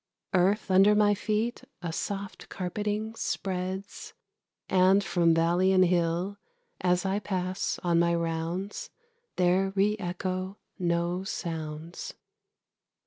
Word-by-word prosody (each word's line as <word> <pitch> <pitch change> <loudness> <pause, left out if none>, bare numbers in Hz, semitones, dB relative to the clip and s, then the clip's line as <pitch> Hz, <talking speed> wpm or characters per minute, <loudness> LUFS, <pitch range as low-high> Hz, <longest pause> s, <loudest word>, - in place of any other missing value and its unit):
Earth 190 +2 +2
under 195 +3 +6
my 210 0 +4
feet 215 +3 -1 0.2
a 165 -2 -3
soft 200 +2 -5
carpeting 210 +4 -3
spreads, 190 -2 -4 0.5
And 190 +2 +4
from 170 -4 +3
valley 175 +3 +3
and 185 -1 +5
hill, 175 +3 0 0.4
as 180 +1 +2
I 195 +1 +1
pass 185 -2 -2
on 170 -1 +3
my 170 0 +3
rounds, 170 +4 -3 0.5
There 185 +2 +2
re 205 +2 +3
echo 185 +1 -3 0.2
no 175 +1 0
sounds. 160 -3 -5
185 Hz, 110 wpm, -28 LUFS, 175-195 Hz, 0.5 s, under